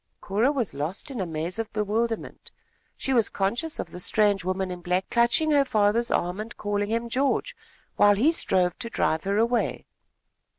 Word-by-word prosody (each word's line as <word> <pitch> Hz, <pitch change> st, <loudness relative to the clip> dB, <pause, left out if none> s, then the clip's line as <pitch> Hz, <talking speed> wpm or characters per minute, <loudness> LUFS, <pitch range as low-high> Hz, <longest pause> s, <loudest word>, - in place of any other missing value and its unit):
Cora 215 Hz, +8 st, +1 dB
was 255 Hz, -8 st, -2 dB
lost 155 Hz, -, -4 dB
in 245 Hz, -6 st, -4 dB
a 185 Hz, -, -2 dB
maze 165 Hz, +5 st, -2 dB
of 225 Hz, -, -3 dB
bewilderment. 220 Hz, +2 st, -2 dB, 0.5 s
She 270 Hz, -, -1 dB
was 230 Hz, -4 st, +3 dB
conscious 235 Hz, +12 st, -1 dB
of -, -, -5 dB
the 180 Hz, -, -8 dB
strange 205 Hz, 0 st, +2 dB
woman 185 Hz, 0 st, -2 dB
in 180 Hz, -1 st, -7 dB
black 180 Hz, +1 st, -1 dB
clutching 240 Hz, +7 st, +3 dB
her 285 Hz, -2 st, +5 dB
father's 220 Hz, -1 st, +2 dB
arm 180 Hz, +3 st, -1 dB
and 220 Hz, +2 st, -7 dB
calling 205 Hz, 0 st, -2 dB
him 230 Hz, +1 st, -1 dB
George, 265 Hz, +4 st, 0 dB, 0.4 s
while 205 Hz, 0 st, +6 dB
he 265 Hz, +11 st, +3 dB
strove 180 Hz, -, +1 dB
to 230 Hz, -, -4 dB
drive 160 Hz, -7 st, 0 dB
her 200 Hz, +1 st, 0 dB
away. 235 Hz, +2 st, 0 dB
210 Hz, 180 wpm, -25 LUFS, 190-235 Hz, 0.5 s, while